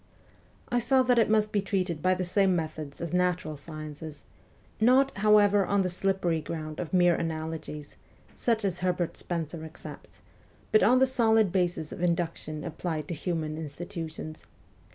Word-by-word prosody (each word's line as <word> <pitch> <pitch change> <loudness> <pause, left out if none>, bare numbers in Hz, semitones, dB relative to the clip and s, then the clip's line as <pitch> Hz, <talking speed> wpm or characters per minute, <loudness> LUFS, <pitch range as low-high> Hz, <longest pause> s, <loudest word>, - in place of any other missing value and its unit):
I 245 - +2
saw 260 +2 +3
that 245 -1 +3
it 225 - +3
must 215 -1 +2
be 205 - +1
treated 185 -5 -2
by 185 +2 +3
the 185 - -2
same 190 +1 +2
methods 155 -4 -5
as 170 0 -4
natural 180 -3 0
sciences; 155 0 -8 0.6
not, 260 +4 +4
however, 205 -1 +5
on 200 +1 +1
the 185 - 0
slippery 180 -3 0
ground 155 0 -6
of 175 - -4
mere 175 -1 +5
analogies, 160 -2 -5 0.4
such 225 -3 0
as 185 -3 -1
Herbert 180 -2 -1
Spencer 165 -2 -4
accepts, 160 0 -11 0.5
but 215 - +5
on 250 +4 +5
the 265 - +5
solid 225 -6 +3
basis 175 -4 -1
of - - -7
induction 165 -3 -1
applied 160 -4 -4
to - - -2
human 160 -1 -3
institutions. 160 0 -7
175 Hz, 155 wpm, -28 LUFS, 160-200 Hz, 0.6 s, however